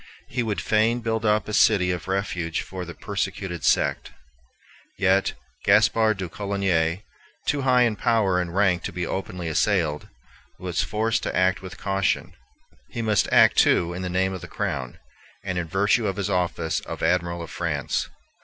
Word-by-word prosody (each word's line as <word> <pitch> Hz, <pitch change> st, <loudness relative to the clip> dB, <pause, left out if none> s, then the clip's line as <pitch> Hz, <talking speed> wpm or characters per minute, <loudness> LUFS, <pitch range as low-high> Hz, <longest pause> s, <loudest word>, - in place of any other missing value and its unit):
He 125 Hz, -, -2 dB
would 110 Hz, -3 st, -2 dB
fain 110 Hz, +3 st, +2 dB
build 115 Hz, -1 st, -1 dB
up 105 Hz, 0 st, +2 dB
a 105 Hz, -, -5 dB
city 100 Hz, -4 st, +4 dB
of 90 Hz, 0 st, -4 dB
refuge 95 Hz, -4 st, -2 dB
for 95 Hz, -1 st, -7 dB
the 85 Hz, -, -9 dB
persecuted 95 Hz, -4 st, -4 dB
sect. -, -, +1 dB, 0.9 s
Yet 95 Hz, 0 st, +2 dB, 0.3 s
Gaspar 110 Hz, -1 st, +4 dB
de 95 Hz, -2 st, -4 dB
Coligny, 95 Hz, -2 st, -1 dB, 0.4 s
too 145 Hz, -1 st, 0 dB
high 125 Hz, -2 st, +4 dB
in 115 Hz, -3 st, +1 dB
power 100 Hz, -4 st, +2 dB
and 85 Hz, 0 st, -5 dB
rank 95 Hz, -3 st, +3 dB
to -, -, -3 dB
be 90 Hz, +1 st, -3 dB
openly 90 Hz, -1 st, -4 dB
assailed, 80 Hz, -2 st, 0 dB, 0.5 s
was 90 Hz, -2 st, -2 dB
forced 110 Hz, +1 st, 0 dB
to -, -, -3 dB
act 95 Hz, 0 st, +2 dB
with 95 Hz, -2 st, -9 dB
caution. 95 Hz, -1 st, -1 dB, 0.6 s
He 115 Hz, -, -4 dB
must 110 Hz, -2 st, +1 dB
act, -, -, +6 dB
too, 85 Hz, 0 st, +4 dB
in 90 Hz, -, -5 dB
the 90 Hz, -, -3 dB
name 95 Hz, +1 st, 0 dB
of 95 Hz, -, -6 dB
the -, -, -8 dB
Crown, 65 Hz, -3 st, -4 dB, 0.5 s
and 95 Hz, -2 st, -2 dB
in 85 Hz, -, -3 dB
virtue 100 Hz, +5 st, +2 dB
of 95 Hz, -, -2 dB
his 100 Hz, -1 st, -2 dB
office 85 Hz, -3 st, 0 dB
of -, -, -7 dB
Admiral 85 Hz, -1 st, 0 dB
of 85 Hz, -, -9 dB
France. -, -, -2 dB
95 Hz, 175 wpm, -24 LUFS, 90-105 Hz, 0.9 s, act